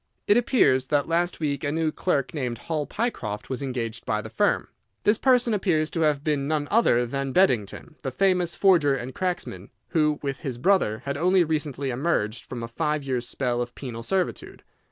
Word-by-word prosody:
It 205 - +4
appears 225 - +3
that 145 0 +1
last 170 +2 0
week 145 -3 -2
a 145 - 0
new 160 0 0
clerk 140 -5 -1
named 125 -6 -3
Hall 155 +3 -3
Pycroft 110 - -3
was 130 - -2
engaged 125 -5 -3
by 105 - -1
the 110 0 -8
firm. 110 - +1 0.4
This 210 +1 +3
person 250 -3 +3
appears 170 -6 +1
to 165 - -2
have 150 -3 +2
been 145 -3 0
none 150 -1 -1
other 165 - +4
than 135 +2 -3
Beddington, 155 - +1
the 135 - -3
famous 180 +3 +1
forger 170 -8 +4
and 125 0 -6
cracksman, 175 - -3 0.2
who, 150 +1 +2
with 135 -2 -3
his 130 -4 -4
brother, 125 - +2
had 140 0 -2
only 180 +3 +4
recently 145 -4 -2
emerged 120 -5 -1
from 120 -2 -6
a - - -4
five 150 +4 -1
years' 125 -3 -2
spell 125 -2 -1
of 120 0 -5
penal 120 -4 -6
servitude. 185 +8 -2
145 Hz, 190 wpm, -25 LUFS, 125-170 Hz, 0.4 s, It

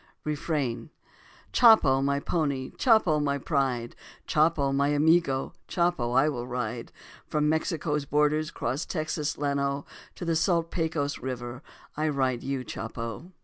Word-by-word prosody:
Refrain: 150 -3 -2 0.6
Chopo, 145 - +6
my 140 0 +1
pony, 140 -5 -1
Chopo, 215 - +3
my 140 -1 0
pride, 130 -5 -1 0.3
Chopo, 150 -3 +2
my 140 +1 +2
amigo, 145 -1 +2
Chopo 170 -9 0
I 135 +4 +4
will 125 -5 -3
ride. 120 -1 -4 0.4
From 150 0 +1
Mexico's 155 -1 0
borders 150 +2 +1
'cross 130 +6 -3
Texas' 155 -2 -2
Llano 140 -1 -1 0.3
To 175 - -6
the 165 -1 +1
salt 165 0 +1
Pecos 160 -4 -1
River, 120 -1 -5 0.3
I 155 +1 0
ride 130 -4 0
you, 135 -1 -3
Chopo. 115 +11 -6
145 Hz, 130 wpm, -27 LUFS, 130-155 Hz, 0.6 s, Chopo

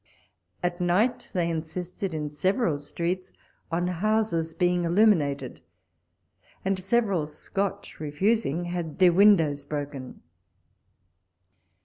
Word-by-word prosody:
At 175 0 -1
night 215 +8 +1
they 175 -3 +1
insisted, 170 +4 -4
in 150 -2 -3
several 185 - +1
streets, 175 +5 -3 0.4
on 170 +2 0
houses 180 -3 0
being 180 0 +2
illuminated, 155 - +2 1.0
and 195 -1 +1
several 195 -7 +1
Scotch 195 +6 -4
refusing, 170 +2 0
had 175 -3 -4
their 180 -2 +6
windows 165 -7 +5
broken. 140 -3 -6
175 Hz, 95 wpm, -26 LUFS, 155-195 Hz, 1.0 s, their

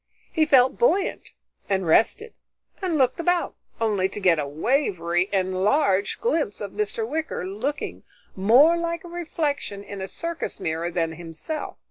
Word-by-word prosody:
He 315 -2 +2
felt 260 -3 +4
buoyant 400 -6 +1 0.4
and 190 -2 +1
rested 230 - +2 0.5
and 360 -4 0
looked 260 +1 +2
about, 350 +1 +1 0.3
only 205 -4 +1
to 200 - -7
get 180 -5 +3
a 145 - -2
wavery, 175 - 0
enlarged 195 +3 +1
glimpse 320 - 0
of 205 -2 -5
Mr. 215 +1 -2
Wicker, 310 - -3
looking 240 +10 -4 0.3
more 245 - +6
like 335 0 -2
a - - -9
reflection 305 - -3
in 200 -1 -8
a 190 - -3
circus 335 - -4
mirror 165 +1 -2
than 165 -2 -1
himself. 165 - -6
215 Hz, 145 wpm, -24 LUFS, -, 0.5 s, more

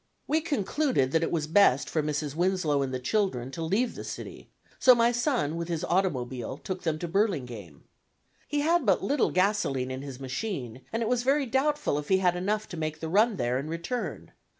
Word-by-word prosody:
We 315 +2 +1
concluded 265 - 0
that 160 - +2
it - - -1
was 160 -3 0
best 155 -6 +4
for 155 - 0
Mrs. 150 -1 -2
Winslow 170 -4 +1
and 135 -1 -2
the 130 - -1
children 130 - -1
to 165 - -6
leave 205 +10 0
the - - -7
city; - - -8 0.3
so 255 -1 +7
my 235 0 +4
son 240 - 0
with 170 0 -3
his 165 -2 -2
automobile 130 -9 -1
took 185 +3 -5
them 160 -2 -1
to 175 - -4
Burlingame. 125 - -2 0.6
He 290 0 0
had 330 +2 +3
but 195 -6 +2
little 270 +6 +2
gasoline 185 -10 +1
in 130 +1 -4
his 135 -2 -8
machine, 130 - -4
and 230 +1 -1
it - - -1
was 245 0 +1
very 275 +3 +2
doubtful 265 - +1
if 145 - -8
he 190 - +5
had 180 -2 +2
enough 210 +4 -1
to 175 - -7
make 155 0 -3
the 160 - -4
run 215 +5 +3
there 125 0 0
and 145 +3 -5
return. 170 +10 -4
175 Hz, 205 wpm, -28 LUFS, 140-225 Hz, 0.6 s, so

